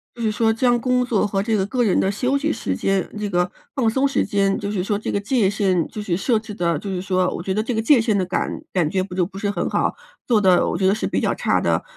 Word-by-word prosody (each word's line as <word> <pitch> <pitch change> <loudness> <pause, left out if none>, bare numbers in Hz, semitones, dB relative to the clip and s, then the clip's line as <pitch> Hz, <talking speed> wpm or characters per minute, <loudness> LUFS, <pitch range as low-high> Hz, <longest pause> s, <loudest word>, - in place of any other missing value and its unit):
就 240 - -8
是 220 -2 +1
说 225 +1 +2
将 240 +1 +2
工 250 +1 +1
作 220 -4 +1
和 195 -1 -1
这 220 0 0
个 190 - +1
个 250 +1 0
人 205 -5 +2
的 195 - +1
休 255 +7 0
息 310 +2 0
时 95 - -2
间， 195 - 0
这 210 -1 -2
个 180 -1 0 0.2
放 255 -5 +1
松 265 +5 +2
时 275 - 0
间， 200 -2 +1
就 205 0 -3
是 190 -4 -1
说， 205 +1 -1
这 215 - -4
个 200 - 0
界 210 0 +1
限 190 -5 +1
就 210 - -7
是 180 -4 -1
设 225 +2 +1
置 215 -1 -9
得 170 -4 0
就 200 - -6
是 185 -2 -3
说 185 -1 0
我 170 - -5
觉 190 - -1
得 215 - 0
这 235 +2 -3
个 220 - +1
界 250 +1 +5
限 220 -3 +1
的 185 - 0
感 180 0 -3
感 175 -5 +1
觉 185 +2 0
不 185 - -8
就 180 -1 +1
不 195 0 -12
是 200 0 -1
很 - - -2
好， - - 0 0.3
做 225 -4 +3
得 185 -2 +4
我 - - -1
觉 190 - +2
得 195 - +3
是 - - -3
比 - - 0
较 - - 0
差 - - +1
的。 - - +1
205 Hz, 320 characters per minute, -21 LUFS, 190-230 Hz, 0.3 s, 界